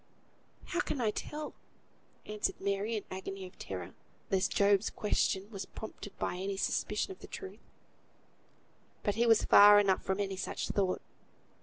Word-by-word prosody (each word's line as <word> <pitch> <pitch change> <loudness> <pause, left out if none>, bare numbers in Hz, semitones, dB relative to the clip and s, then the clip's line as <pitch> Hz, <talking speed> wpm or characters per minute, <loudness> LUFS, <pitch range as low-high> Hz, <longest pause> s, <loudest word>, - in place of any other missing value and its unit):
"How 345 - -2
can 295 - -1
I 220 -3 +2
tell?" 300 +7 -5 0.7
answered 210 0 -2
Mary, 200 +3 -1
in 210 - -4
an - - -3
agony 190 0 -6
of 180 - -14
terror, 90 -2 -6 0.4
lest 190 0 +2
Job's 200 +1 +3
question 200 -2 0
was 195 -3 -6
prompted 210 -2 -9
by - - -2
any 195 +1 -3
suspicion 210 - -1
of 380 - -10
the - - -11
truth. 385 -1 -8 1.4
But 205 - +1
he 235 +3 +2
was 225 -2 +5
far 205 0 +9
enough 195 -2 +3
from 190 +1 -2
any 195 -1 -2
such - - -3
thought. 190 -2 0
200 Hz, 160 wpm, -32 LUFS, 190-215 Hz, 1.4 s, far